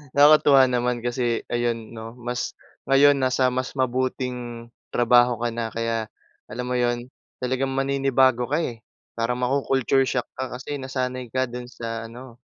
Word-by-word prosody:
Nakakatuwa 145 -2 +7
naman 125 -1 0
kasi, 120 -1 -1
ayun, 120 -2 -2
'no, 115 +1 -9
mas 125 0 -4 0.3
ngayon 140 +1 +6
nasa 130 0 +2
mas 130 +1 -3
mabuting 125 -2 -2 0.2
trabaho 120 0 +4
ka - - +1
na. 115 -1 -3
Kaya, 115 -1 -2 0.4
alam 125 +4 -5
mo 125 - -2
'yon, 120 0 0 0.3
talagang 130 +1 -1
maninibago 135 -2 +2
ka, 150 - +1
eh. 120 -8 -4 0.3
Parang 115 +2 -1
maku-culture 135 +1 +1
shock 125 - -1
ka 130 0 -4
kasi 145 +2 -5
nasanay 130 -1 -3
ka 130 +3 0
do'n 125 0 -8
sa 115 -2 -6
ano 120 0 -11
125 Hz, 150 wpm, -24 LUFS, 120-130 Hz, 0.4 s, Nakakatuwa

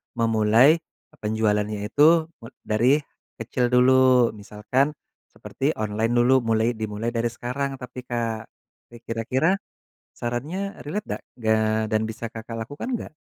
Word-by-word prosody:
memulai 115 +6 +4 0.4
penjualannya 105 -1 0
itu 160 +6 +4
me 115 - -10 0.2
dari 120 +6 +3 0.4
kecil 125 -1 0
dulu 125 0 +5
misalkan 105 +7 -1 0.3
seperti 140 +4 -3
online 110 +2 -1
dulu 125 +2 +5
mulai 115 -1 +1
dimulai 110 +2 -3
dari 120 0 0
sekarang 125 +4 -4
tapi 125 -1 -9
Kak, 115 -2 -3 0.4
rik 120 0 -14
kira-kira 125 +8 +1 0.6
sarannya 155 +12 -4
relate 205 +9 -3
dak - - -25 0.2
gak, 110 0 +1
dan 110 0 +2
bisa 115 +1 -6
Kakak 115 +1 -7
lakukan 145 - -7
nggak? - - -7
120 Hz, 125 wpm, -24 LUFS, 110-130 Hz, 0.6 s, dulu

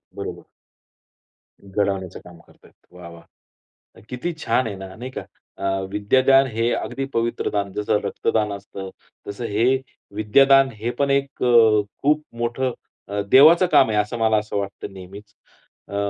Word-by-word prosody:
बरोबर. - - -7 1.2
घडवण्याचं 95 -2 -3
काम 90 -1 -15
करतायत. - - -22 0.2
वाह 90 -1 -11
वाह! 85 0 -14 0.9
किती 130 +8 -4
छान 130 -6 0
आहे 100 - -5
ना, 95 0 -10
नाही 125 +3 -8
का? - - -6 0.4
अ, 95 0 -1
विद्यादान 130 +6 +3
हे 115 0 -1
अगदी 135 - -3
पवित्र 115 0 -1
दान, 100 -1 -2
जसं 105 0 0
रक्तदान 105 +1 -1
असतं 100 -1 -8 0.4
तसं 100 +4 -6
हे, 115 +6 +2 0.4
विद्यादान 135 +6 +4
हे 120 +2 -2
पण 140 0 +1
एक 140 -1 -1
अ, 115 -3 +5 0.2
खूप 150 +2 +2
मोठं 120 +2 -1 0.4
अ, 100 0 -2
देवाचं 160 +7 +7
काम 130 - +5
आहे, 105 - 0
असं 105 +3 -2
मला 110 -1 +3
असं 105 -1 -3
वाटतं 100 0 -6
नेहमीच 100 +3 -12 0.6
अ 100 - -6
110 Hz, 150 wpm, -22 LUFS, 100-130 Hz, 1.2 s, देवाचं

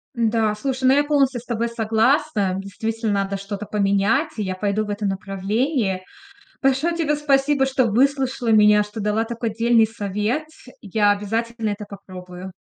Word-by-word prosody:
Н-да, 225 -2 +1
слушай, 260 +3 -3
ну 260 - +6
я 290 - +4
полностью 275 -4 +1
с 245 - -21
тобой 235 0 -2
согласна. 225 -2 +1
Действительно, 220 +3 -3
надо 195 0 -1
что-то 200 +1 -6
поменять, 210 +9 +1
и 210 - -1
я 185 -1 -3
пойду 205 +2 -1
в - - -9
этом 205 -1 -2
направлении. 195 +2 -1 0.6
Большое 275 +5 +1
тебе 305 -3 0
спасибо, 280 -1 +2
что 265 -2 +1
выслушала 260 +1 +1
меня, 210 -1 +5
что 210 +1 -9
дала 210 +2 0
такой 230 0 -4
дельный 230 0 +4
совет. 210 +6 -2 0.4
Я 205 0 +2
обязательно 225 +2 -2
это 205 0 -4
попробую. 185 -2 -10
220 Hz, 155 wpm, -22 LUFS, 205-260 Hz, 0.6 s, ну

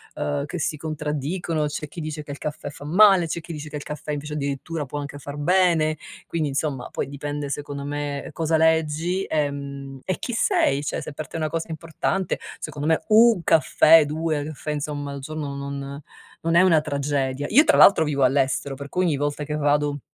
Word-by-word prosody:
ehm, 70 -1 -2
che - - -5
si - - -1
contraddicono, 155 +1 -2
c'è 150 +1 -5
chi 165 +3 -8
dice 155 0 -5
che 145 - -9
il 140 - -6
caffè 150 -1 -5
fa 145 - -11
male, 190 +2 +6
c'è 170 - -3
chi 170 - -9
dice 150 0 -7
che 150 - -5
il 145 - -7
caffè 150 0 -6
invece, 150 +1 -4
addirittura, 145 +2 -3
può 145 +2 -5
anche 145 0 -6
far 145 +1 -8
bene. 165 -1 +3 0.3
Quindi, 155 -3 -1
insomma, 135 -2 -2
poi - - -3
dipende 145 +1 -5
secondo 145 0 -4
me 145 0 -4
cosa 160 +1 +1
leggi, 160 +3 +2
ehm, 140 -2 -3
e 185 - -1
chi 240 - -4
sei; 230 - +2
cioè, - - -2
se 155 - -7
per 150 -1 -6
te - - -12
è - - -3
una 155 -1 -1
cosa 165 +2 -3
importante, 165 +3 -2 0.2
secondo 145 0 -5
me 160 - +3
1 225 -2 +6
caffè, 160 0 +6
2 155 0 -1
caffè, 150 0 -5
insomma, 145 -1 -3
al 140 - -6
giorno 145 -1 -5
non 140 0 -6 0.4
non 165 +1 0
è 170 - +7
una 175 -4 +5
tragedia. 140 -2 -1
Io 285 +7 +7
tra - - +4
l'altro 195 -5 +7
vivo 140 -2 0
all'estero, 135 +1 +1
per 140 +1 -8
cui 185 - 0
ogni 155 -4 +1
volta 145 +1 -2
che 150 +1 -3
vado 145 0 +1
150 Hz, 205 wpm, -24 LUFS, 140-160 Hz, 0.4 s, è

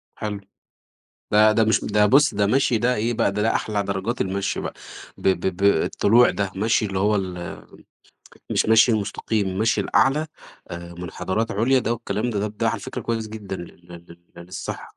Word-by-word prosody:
حلو، 105 -2 -4 0.9
ده 105 +1 +6
ده 110 +1 +3
مش 110 +1 +2
ده 105 0 +2
بُص 140 +8 +4
ده 100 0 +1
مشي 125 0 +2
ده 125 +3 +1
إيه 115 +3 -1
بقى 115 -3 +1
ده 105 - -2
ده 110 +1 +1
أحلى 105 -2 -1
درجات 100 +5 -3
المشي 95 +1 -2
بقى، - - -5 0.4
ب - - -2
ب 95 -1 0
ب 100 - -4
الطلوع 100 +5 +4
ده 100 -2 -2
مشي 110 +2 +1
اللي 95 -1 -3
هو 105 +2 +2
ال 90 -3 -5 0.9
مش - - +1
مشي 110 +2 +5
المستقيم 105 0 -1
المشي 105 +3 0
الأعلى، 135 +9 +2 0.4
آآ 85 0 -8
مُنحدرات 95 +5 -3
عُليا 120 +6 +2
ده 120 - -1
والكلام 110 +1 -3
ده 105 -3 -2
طَب 105 0 -4
ده - - +1
على - - -2
فكرة - - -6
كويّس 115 -2 -3
جدًا 105 -3 -6
لل 85 - -8 0.2
لل 85 0 -13 0.2
لل 85 - -9
للصحة. 90 +1 -7
105 Hz, 190 wpm, -23 LUFS, 95-115 Hz, 0.9 s, ده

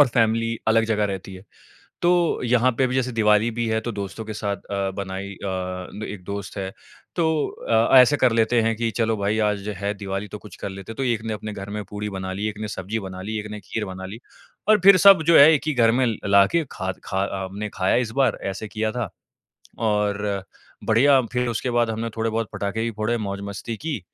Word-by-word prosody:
और 145 - +8
फ़ैमिली 115 0 +1
अलग 115 0 +4
जगह 105 -2 +1
रहती 95 -1 -5
है। 95 +2 -12 0.6
तो 175 -1 +2
यहाँ 125 +1 +3
पे 130 - +3
भी 125 - -2
जैसे 130 -1 0
दिवाली 110 0 +3
भी 120 +1 -2
है 110 0 +1
तो 120 - -4
दोस्तों 100 +1 -5
के 110 - -5
साथ 100 -1 -2
अ, 100 -1 -3
बनाई 100 0 -5
अ, 95 +2 -5
एक 100 -3 -8
दोस्त 100 +1 -6
है। 95 -1 -3 0.5
तो 170 - +1 0.4
अ, 115 +3 +5
ऐसे 130 +3 +7
कर 130 -3 +3
लेते 115 +1 +3
हैं 115 0 +1
कि 115 +1 -1
चलो 115 -1 +1
भाई 105 +2 0
आज 100 -1 -2
है 100 +2 -2
दिवाली 100 0 -4
तो 105 - -8
कुछ 105 - -13
कर - - -3
लेते 95 +2 -8
हैं। - - -8
तो 135 - -1
एक 120 -4 0
ने 110 -1 -3
अपने 105 0 -6
घर 100 0 -7
में 105 0 -4
पूड़ी 105 0 -4
बना 95 -1 -5
ली, 105 +3 -2
एक 105 - -8
ने 110 - -3
सब्जी 105 +2 -4
बना 95 -1 -7
ली, 110 +3 -4
एक 105 - -6
ने 105 - -6
खीर 110 +1 -4
बना 95 0 -7
ली 105 +5 -8 0.5
और 215 - +6
फ़िर 195 0 +8
सब 195 -2 +8
जो 170 - +7
है 145 +3 +9
एक 150 - +2
ही 155 - +1
घर 115 -3 +4
में 125 +2 +2 0.2
लाके 100 +11 +4
ख़ाद 95 0 -4
ख़ा 95 0 -1 0.2
हमने 100 +3 -5
खाया 95 0 +1
इस - - -9
बार 125 -5 +2
ऐसे 105 +3 -6
किया 110 +1 -2
था 115 -5 -3 0.7
और 105 -2 0 0.4
बढ़िया 130 +4 +5
फ़िर 125 0 0
उसके 120 +2 -2
बाद 120 -1 +2
हमने 115 +1 -3
थोड़े 115 0 0
बहुत 115 -1 -2
पटाखे 100 +2 -2
भी 115 - -1
फोड़े, 110 +2 -1
मौज 100 -3 -4
मस्ती 100 +3 -5
की, 150 -4 -3
110 Hz, 230 wpm, -23 LUFS, 100-115 Hz, 0.7 s, है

